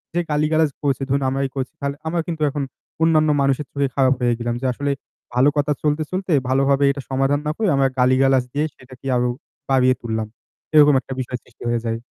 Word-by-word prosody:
যে - - +2
গালিগালাজ 155 +1 +2
করছে 140 -2 0
ধরুন 140 +1 +1
আমরাই 135 0 -1
করছি 130 -1 -3 0.3
আমরা 170 +1 0
কিন্তু 160 -2 -4
এখন 140 0 -3 0.4
অন্যান্য 155 -1 +4
মানুষের 140 +1 +1
চোখে 140 -1 0
খারাপ 135 -1 +4
হয়ে 120 -1 +3
গেলাম 120 0 -2
যে - - -3
আসলে 140 +3 -2 0.4
ভালো 130 +4 +4
কথা 145 0 +1
চলতে, 150 +1 +1
চলতে 185 -1 -3 0.2
ভালোভাবে 135 +1 +3
এটা 140 - -5
সমাধান 135 +2 +1
না - - +1
করে 220 -2 0
আমরা 135 0 +3
গালিগালাজ 130 +1 +4
দিয়ে 150 +2 +1
সেটাকে 130 0 -16
আরো 125 0 +1 0.4
বাড়িয়ে 130 -1 +4
তুললাম। 110 -2 -3 0.5
এরকম 150 -1 +7
একটা 135 - -7
বিষয় 125 0 -3
সৃষ্টি 120 - -16
হয়ে 120 -1 -1
যায়। 115 0 -1
135 Hz, 195 wpm, -21 LUFS, 130-150 Hz, 0.5 s, এরকম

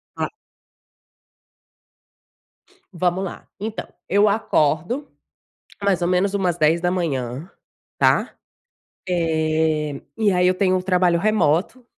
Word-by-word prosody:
Claro. - - -2 2.7
Vamos 180 +2 0
lá. 185 - -8
Então, 215 +1 -4 0.2
eu 205 +2 +4
acordo, 200 - 0 0.8
mais 195 -3 +1
ou 175 - +1
menos 185 +2 +1
umas 180 -4 0
10h 160 +2 +3
da 175 - +1
manhã, 145 -3 -3 0.5
tá. - - +2 0.7
Eh, 160 -3 0 0.2
e 215 -3 +2
aí 180 0 +3
eu 185 - +3
tenho 185 -1 +2
um 185 - 0
trabalho 180 -2 +2
remoto, 210 - +1
180 Hz, 110 wpm, -22 LUFS, 160-195 Hz, 2.7 s, eu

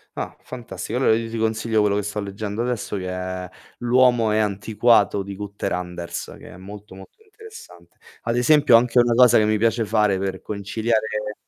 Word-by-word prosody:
Ah, - - -5
fantastico. 120 -1 -6
Allora 110 -4 +3
io 115 0 -3
ti 115 - -5
consiglio 110 0 0
quello 100 -1 +1
che 105 - -1
sto 105 +1 -4
leggendo 105 +2 -5
adesso 120 -4 -3
che 90 -1 -5
è 90 0 -5 0.3
"L'uomo 120 -2 +3
è 105 - +1
antiquato" 105 0 +2
di 100 0 -8
Günther 100 -1 -5
Anders, 90 -1 -5
che - - -13
è - - -13
molto, 100 +1 -11
molto 95 - -15
interessante. 425 - -15 0.3
Ad 115 +1 -1
esempio, 145 -1 +5
anche 120 +1 +4
una 120 -1 +3
cosa 120 -1 +6
che 105 - +2
mi 110 0 +1
piace 115 +1 +1
fare 105 -3 +1
per 95 -1 -4
conciliare 105 +1 -2
105 Hz, 185 wpm, -22 LUFS, 100-115 Hz, 0.3 s, cosa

